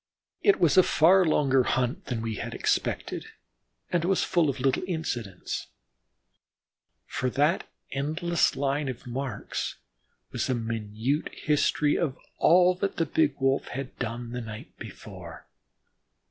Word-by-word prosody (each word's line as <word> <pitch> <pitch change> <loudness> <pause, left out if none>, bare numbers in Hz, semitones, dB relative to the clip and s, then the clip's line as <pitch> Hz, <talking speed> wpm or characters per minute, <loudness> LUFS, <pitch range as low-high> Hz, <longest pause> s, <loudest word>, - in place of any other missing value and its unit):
It 405 - +4
was 165 -2 +4
a - - +11
far 185 +2 +5
longer 135 -4 +3
hunt 125 0 0
than 115 -3 -3
we 110 -2 -3
had - - -5
expected, - - -1 0.6
and 175 -2 +1
was 190 +2 +2
full 175 -5 +2
of 135 - -3
little 135 +1 +2
incidents, 120 - -3 1.4
for 130 - -2
that 150 +7 +1 0.2
endless 160 +5 +1
line 140 +1 0
of 130 0 -7
marks 125 -2 -4 0.6
was - - -2
a 130 - +2
minute 115 +4 -2
history 150 -1 +1
of 145 -6 -1 0.2
all 180 +2 +6
that 195 +1 -1
the 165 - +1
big 150 -1 +2
Wolf 135 0 +1
had 135 +1 -6
done 120 0 -4
the 125 0 -4
night 110 -2 -9
before. - - -10
135 Hz, 135 wpm, -27 LUFS, 120-160 Hz, 1.4 s, a